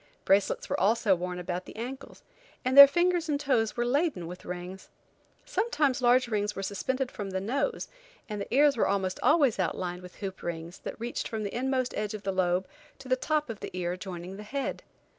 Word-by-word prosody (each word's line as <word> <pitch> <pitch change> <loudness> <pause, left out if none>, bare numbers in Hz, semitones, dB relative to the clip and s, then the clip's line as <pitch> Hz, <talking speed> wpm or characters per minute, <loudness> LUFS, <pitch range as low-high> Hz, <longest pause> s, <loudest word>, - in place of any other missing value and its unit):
Bracelets 195 +1 +2
were - - -1
also 210 0 +3
worn 180 0 -3
about 180 +1 -4
the - - -11
ankles, 255 +5 -7 0.4
and 255 +1 +1
their 280 0 +13
fingers 345 +2 +1
and 285 -1 +1
toes 240 -7 +1
were 240 - +1
laden 275 - 0
with 180 +2 -9
rings. 180 +1 -7 0.6
Sometimes 310 - 0
large 245 +1 +4
rings 210 -2 -1
were 195 - -4
suspended 255 +7 -2
from 205 -2 -5
the 190 0 -2
nose, 275 - -1 0.4
and 210 -2 -4
the - - -7
ears 285 +2 +5
were 230 - +2
almost 190 -2 -1
always 285 -9 +4
outlined 180 0 -2
with 180 0 -12
hoop 190 -2 -6
rings, 170 +1 -5
that - - -7
reached 235 +1 -3
from 220 -1 -4
the 200 - -4
inmost 255 0 0
edge 210 0 -2
of 210 - -8
the 195 - -1
lobe 185 0 +1 0.3
to 270 - -12
the 255 - +3
top 300 +3 0
of 225 -3 -6
the - - -6
ear 175 0 -1
joining 185 0 -7
the - - -8
head. 270 +7 -4
215 Hz, 205 wpm, -29 LUFS, 185-265 Hz, 0.6 s, their